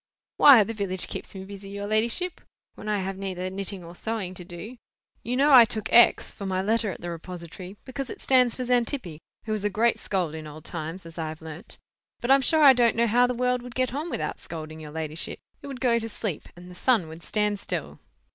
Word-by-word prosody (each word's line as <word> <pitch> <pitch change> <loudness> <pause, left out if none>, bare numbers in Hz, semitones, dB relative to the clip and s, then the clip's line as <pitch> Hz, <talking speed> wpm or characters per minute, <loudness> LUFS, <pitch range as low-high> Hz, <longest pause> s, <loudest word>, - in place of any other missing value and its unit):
"Why, 265 -7 +9
the 225 - -5
village 190 -4 -2
keeps - - -7
me 190 0 -7
busy, 195 0 -9
your 200 0 -5
ladyship, 230 - 0 0.3
when 215 - -7
I 205 -2 +1
have 190 0 -4
neither 185 -1 -4
knitting 195 -1 -4
or 170 0 -10
sewing 205 -1 -4
to 180 - -7
do. 175 +8 -9 0.4
You 245 +2 -2
know 285 +2 +4
I 250 -3 +10
took 220 -1 -3
X. 240 - +6
for 200 - -6
my 185 -1 0
letter 220 +2 +1
at 185 - -7
the 175 - -4
repository, 180 +3 -8
because 260 +1 -5
it - - -7
stands 250 -3 +3
for 255 - -3
Xantippe, 240 - -1 0.3
who 220 - -4
was 215 -2 -1
a 205 - +2
great 225 +4 +2
scold 180 -6 -1
in 155 -1 -7
old 155 +1 -11
times, 165 +2 -5
as 165 0 -10
I 160 -1 -2
have 160 0 -9
learnt. 160 +7 -9 0.4
But 240 - 0
I'm 275 0 +6
sure 310 +4 +4
I 275 -2 +10
don't 240 -2 +3
know 235 +1 +3
how 245 +2 +4
the 250 - -2
world 250 0 +1
would 245 -1 -10
get 255 -1 0
on 305 +5 -3
without - - -3
scolding, 155 -1 -7
your 155 -1 -9
ladyship. 155 +1 -5 0.2
It - - -9
would 270 -3 -7
go 240 -2 +3
to 225 0 -5
sleep, 205 -6 -4
and 180 +1 -12
the - - -10
sun 210 -2 +2
would 160 +1 -10
stand 210 +1 -1
still." - - -5
205 Hz, 235 wpm, -26 LUFS, 175-240 Hz, 0.4 s, I